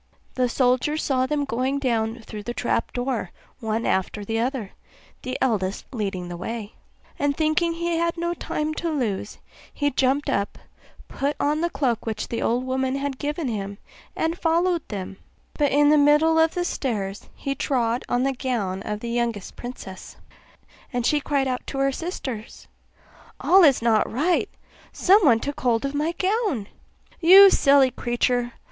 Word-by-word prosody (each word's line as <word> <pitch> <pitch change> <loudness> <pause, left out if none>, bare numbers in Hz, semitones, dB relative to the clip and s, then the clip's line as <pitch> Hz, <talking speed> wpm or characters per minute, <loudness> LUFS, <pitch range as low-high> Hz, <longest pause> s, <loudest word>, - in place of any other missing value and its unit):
The 250 -1 +1
soldier 255 +4 +1
saw 260 -4 0
them 290 0 0
going 260 +2 -1
down 230 -4 -1
through 215 -1 -8
the 240 +3 -6
trap 245 - -1
door 245 -6 -2 0.3
one 225 -1 -2
after 190 +2 0
another, 225 -1 -2 0.5
the 255 0 -4
eldest 210 -7 0
leading 195 -6 -3
the 175 0 -6
way; 215 +3 -5 0.5
and 285 -1 0
thinking 315 +2 +1
he 340 0 -1
had 335 0 0
no 340 +1 -1
time 310 -2 -3
to 340 - -1
lose, 225 -10 -2 0.3
he 290 -1 -1
jumped 270 +3 +1
up, 200 0 -1 0.5
put 280 +2 -2
on 300 +2 +1
the 345 - +1
cloak 245 -8 -1
which 220 - -3
the 230 - -3
old 245 +2 +1
woman 260 0 -1
had 275 -1 -3
given 295 +1 -2
him, 200 -3 -4 0.4
and 325 +2 -1
followed 340 +1 +2
them; 195 -2 -6 0.4
but 290 -2 +1
in 290 +1 +4
the 300 0 +5
middle 300 +3 +4
of 320 0 +3
the 355 -1 0
stairs 205 - -3
he 275 - -3
trod 245 -3 0
on 245 +1 +1
the 270 0 +1
gown 225 -8 -2
of 210 +1 -4
the 235 - -4
youngest 235 -4 -2
princess, 240 -6 -9 0.8
and 245 -2 -1
she 300 - +3
cried 275 -2 0
out 250 -1 -2
to - - -5
her 275 0 +2
sisters, 260 - -6 0.7
'All 380 0 +5
is 275 -7 +5
not 225 -2 +2
right; 315 +9 +1 0.4
someone 355 - +5
took 285 +4 -5
hold 240 -1 +1
of 275 - -3
my 305 +3 0
gown.' 380 - 0 0.5
'You 385 +3 +9
silly 275 -2 +5
creature! 240 0 -1
260 Hz, 165 wpm, -24 LUFS, 230-300 Hz, 0.8 s, You